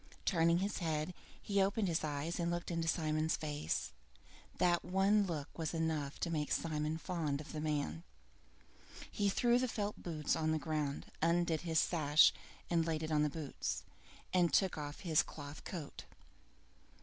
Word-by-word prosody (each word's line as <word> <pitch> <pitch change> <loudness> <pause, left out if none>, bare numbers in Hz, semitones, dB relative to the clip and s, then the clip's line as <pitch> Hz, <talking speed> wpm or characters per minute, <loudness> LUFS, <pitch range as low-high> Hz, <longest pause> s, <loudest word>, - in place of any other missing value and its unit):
Turning 170 -2 +4
his 200 +3 -1
head, 160 0 -1 0.3
he 200 -1 +1
opened 200 +1 +2
his 165 -2 0
eyes 155 +3 -2
and 170 0 +1
looked 175 0 -2
into 165 -1 -1
Simon's 155 -1 +1
face. 145 - -2 0.7
That 175 -1 +3
one 195 +3 +3
look 155 -4 -4
was 160 0 -3
enough 155 -3 -1
to 170 - 0
make 150 -2 -1
Simon 155 -1 0
fond 160 -5 -2
of 155 - -8
the 155 - -4
man. 145 - -1 1.1
He 205 -1 +1
threw 240 +4 +3
the 255 - +1
felt 210 -3 -3
boots 155 -4 -1
on 155 0 0
the - - +2
ground, 150 -2 -2
undid 170 -1 +2
his 165 -2 +1
sash, 155 -2 +5 0.4
laid 165 -2 +1
it 155 - -3
on 150 -1 +3
the 150 - +3
boots, 150 -2 -4 0.5
and 175 -2 +4
took 190 -2 +3
off 145 -1 -6
his 165 -5 +4
cloth 145 -1 -9
coat. 160 -6 -6
160 Hz, 160 wpm, -36 LUFS, 150-175 Hz, 1.1 s, sash